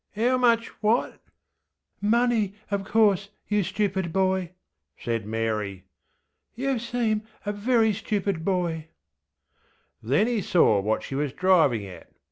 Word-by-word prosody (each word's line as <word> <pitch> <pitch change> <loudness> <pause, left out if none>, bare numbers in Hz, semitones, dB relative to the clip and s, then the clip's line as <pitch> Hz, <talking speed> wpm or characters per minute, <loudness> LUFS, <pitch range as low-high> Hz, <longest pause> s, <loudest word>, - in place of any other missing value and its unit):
ŌĆÖ 235 +3 +2
ŌĆśHow 255 - +2
much 235 -2 +3
what? 220 +3 +1 0.8
ŌĆÖ 205 - +1
ŌĆśMoney, 230 -4 +2 0.2
of 200 -1 -1
course, 200 -2 +2 0.2
you 210 0 +1
stupid 190 -2 -1
boy, 190 -1 +1 0.5
ŌĆÖ - - -15
said 115 -3 -2
Mary. 105 -4 -2 0.7
ŌĆśYou 265 0 0
seem 230 -3 -1 0.2
a 205 - 0
very 220 +1 +2
stupid 200 -4 -2
boy. 170 -4 -1 1.2
ŌĆÖ 110 - -10
Then 145 +11 +4
he 235 -3 0
saw 140 - +3
what 110 +3 -1
she - - -7
was 140 0 -1
driving 160 - +3
at. 90 -4 -12
195 Hz, 140 wpm, -25 LUFS, 145-220 Hz, 1.2 s, Then